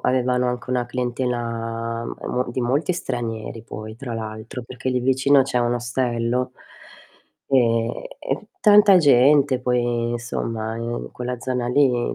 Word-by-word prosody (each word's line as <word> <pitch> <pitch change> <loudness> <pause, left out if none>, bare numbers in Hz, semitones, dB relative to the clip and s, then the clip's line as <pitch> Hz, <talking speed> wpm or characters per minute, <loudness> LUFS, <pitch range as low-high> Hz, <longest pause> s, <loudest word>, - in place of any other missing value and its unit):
avevano 125 -1 +1
anche 125 +1 -4
una 125 -1 0
clientela 115 -2 -3
m - - -5
e - - -5
mo 125 0 -1
di 125 - -3
molti 140 +8 +1
stranieri, 115 -8 -4
poi, 110 0 -8
tra 120 -2 -6
l'altro, 110 +2 -6
perché 125 +2 -6
lì 125 - 0
vicino 135 +2 +4
c'è 130 -1 -1
un 120 0 +1
ostello, 120 0 -1 1.0
ehm, 115 -3 +3 0.3
e - - -3
tanta 205 -2 +7
gente 140 -2 +5
poi, 120 -1 0
insomma, 115 -1 -3
in 115 +1 -4
quella 125 0 -4
zona 125 -1 -2
lì 125 -2 +2
125 Hz, 145 wpm, -22 LUFS, 115-130 Hz, 1.0 s, tanta